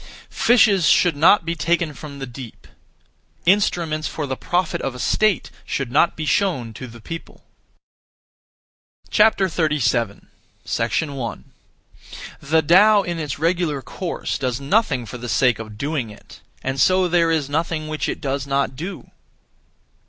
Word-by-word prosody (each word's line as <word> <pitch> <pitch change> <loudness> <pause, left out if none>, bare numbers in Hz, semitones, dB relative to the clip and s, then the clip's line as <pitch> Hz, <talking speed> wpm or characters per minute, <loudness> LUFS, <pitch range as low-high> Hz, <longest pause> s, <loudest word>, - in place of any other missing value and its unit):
Fishes 205 -8 +4
should 175 -4 +4
not 165 +5 +5
be 170 - -1
taken 170 -1 0
from 145 0 -9
the 135 - -5
deep; 120 -2 -11 0.8
instruments 170 -5 +1
for 155 - -4
the 135 -1 -3
profit 175 +5 -1
of 135 -2 -3
a - - -9
state 215 - +1
should 135 -4 -3
not 160 +5 +3
be 155 - -4
shown 150 - 0
to 130 - -8
the 120 0 -12
people. 165 +9 -9 1.7
37. 150 - +2 0.8
1. 130 -4 -5 1.0
The 160 +3 +2
Tao 200 +6 +6
in 175 -2 -4
its 150 -4 -4
regular 165 -3 0
course 180 -3 -4
does 125 -2 -2
nothing 140 - +1
(for 125 +2 -8
the 120 0 -6
sake 125 +2 +2
of 110 -2 -8
doing 140 -3 -2
it), 105 - -15 0.2
and 135 0 -1
so 185 0 +4
there 170 -1 +2
is 160 -4 0
nothing 155 +1 -2
which 155 0 -2
it - - -4
does 140 0 -3
not 135 -2 0
do. 175 +8 -7
155 Hz, 145 wpm, -21 LUFS, 130-175 Hz, 1.7 s, Tao